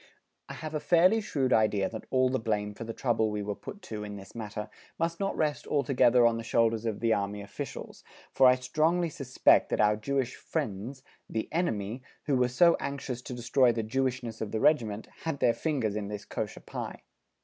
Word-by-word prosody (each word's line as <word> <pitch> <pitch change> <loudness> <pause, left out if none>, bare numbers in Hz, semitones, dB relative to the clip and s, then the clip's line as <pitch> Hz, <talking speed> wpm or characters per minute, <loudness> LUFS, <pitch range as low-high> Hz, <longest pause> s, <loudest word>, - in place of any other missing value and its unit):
I - - -6
have 155 0 -6
a 155 - 0
fairly 180 +8 +4
shrewd 135 -9 0
idea 105 -3 +3
that 110 - -8
all 130 -1 +3
the 130 - 0
blame 105 -2 -1
for 110 - -7
the 115 - -5
trouble 115 -2 +1
we 105 -1 -3
were 105 0 -2
put 205 - -10
to 105 -1 -6
in 105 -1 -6
this 100 -1 -11
matter 105 -2 -5 0.3
must 165 0 -1
not 195 -1 -1
rest 150 -2 -1
altogether 125 -4 +4
on 115 -1 +3
the 115 - -5
shoulders 115 0 +1
of 110 -2 -3
the 115 -1 +3
Army 100 0 -2
officials, 100 - -7 0.3
for 130 - +6
I 125 - +7
strongly 155 +7 +1
suspect 135 -4 +3
that - - -1
our 105 0 +4
Jewish 130 +3 -2
"friends," 130 -2 -4 0.3
the 110 - -2
enemy, 115 - -1 0.2
who 140 - +1
were 125 -1 +3
so 170 +7 +5
anxious 130 -3 -4
to 125 - -7
destroy 125 +1 +3
the 115 -1 -2
Jewishness 125 -1 -2
of 110 - -2
the 110 - -1
Regiment, 110 -7 +2
had 160 -4 -3
their 120 - +4
fingers 130 -10 -1
in 105 -1 -3
this 105 0 -6
Kosher - - -5
pie! - - -7
120 Hz, 205 wpm, -29 LUFS, 110-140 Hz, 0.3 s, I